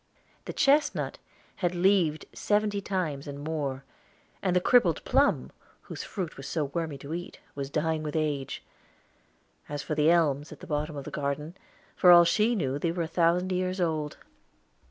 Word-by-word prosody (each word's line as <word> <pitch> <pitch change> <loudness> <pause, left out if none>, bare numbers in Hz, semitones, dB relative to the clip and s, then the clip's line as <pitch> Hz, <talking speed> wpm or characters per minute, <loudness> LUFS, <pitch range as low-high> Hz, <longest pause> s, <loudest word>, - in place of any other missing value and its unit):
The - - -5
chestnut 290 +2 +2 0.4
had 180 -1 -1
leaved 175 -4 +2
seventy 205 -1 0
times 165 -8 -3
and 140 0 -6
more; 145 -3 -3 0.6
and 185 -2 0
the - - +5
crippled 245 +6 +3
plum, - - +2 0.3
whose - - -7
fruit 185 -6 -5
was 135 0 -7
so 155 -1 -1
wormy 160 -4 -2
to 140 +3 -7
eat, 175 +1 -6
was 140 -1 -5
dying 155 +1 0
with 150 0 -5
age. 150 -4 -2 1.1
As 145 0 -4
for 155 - -3
the 150 +1 +3
elms 150 -4 +2
at - - -10
the - - -10
bottom 150 0 -2
of 140 - -5
the - - -7
garden, 150 +3 -3 0.4
for 180 - +5
all 175 -1 +9
she 215 +7 +2
knew 140 -8 -1
they 165 +2 0
were 170 0 -2
a - - -3
thousand 175 +2 +2
years 185 +1 -1
old. 155 -4 -1
160 Hz, 175 wpm, -28 LUFS, 145-180 Hz, 1.1 s, all